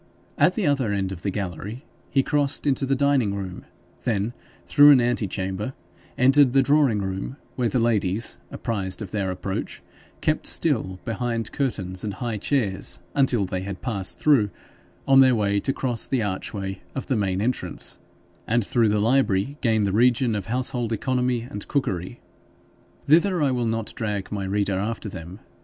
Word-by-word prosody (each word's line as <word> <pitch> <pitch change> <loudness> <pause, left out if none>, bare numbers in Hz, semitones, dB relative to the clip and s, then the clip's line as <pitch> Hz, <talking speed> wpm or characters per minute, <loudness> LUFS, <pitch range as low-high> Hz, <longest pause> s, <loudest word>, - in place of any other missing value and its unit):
At - - +3
the 215 -6 0
other 135 -7 +1
end 95 -2 -1
of 90 -3 -7
the 100 - -1
gallery 100 - -5 0.2
he 135 - +2
crossed 145 0 0
into 135 -1 +1
the 135 - +2
dining 135 -7 +2
room, 95 -2 -6 0.4
then 110 -1 0 0.3
through 145 0 +7
an 140 -3 +8
ante 120 -3 +1
chamber 95 +6 -3 0.4
entered 135 0 +5
the 135 -1 +5
drawing 130 -7 +3
room, 95 +7 -4 0.2
where 120 -2 0
the 130 - 0
ladies, 110 -2 0
apprised 100 -4 -3
of 95 - -9
their 100 -3 -1
approach, 95 +1 -4 0.4
kept - - 0
still 95 0 +2
behind 115 0 -2
curtains 95 -9 -2
and 105 -3 -3
high 115 +1 -3
chairs, 105 -5 0 0.2
until 125 -7 +2
they 90 0 -3
had 95 0 -6
passed 95 -8 -2
through, 135 -9 +4 0.6
on 135 0 +7
their 130 -2 +6
way 100 -2 +1
to 135 - 0
cross 125 -4 -1
the 130 -4 0
archway 95 -1 -4
of 135 - -3
the 130 - 0
main 95 -3 0
entrance, 120 +4 -2 0.5
and 115 -1 +2
through 115 0 +2
the 105 - +2
library 115 +1 +2
gain 110 -3 +2
the 100 - +1
region 120 +2 +3
of 100 -3 -3
household 125 -1 -1
economy 125 +1 0
and 105 -4 -8
cookery. 110 - -2 0.9
Thither 170 +5 +4
I 140 - +2
will 120 -2 0
not 115 -1 -2
drag 105 -5 -3
my 100 -2 -3
reader 100 0 0
after 110 +1 -3
them. 90 +2 -9
110 Hz, 170 wpm, -24 LUFS, 100-130 Hz, 0.9 s, an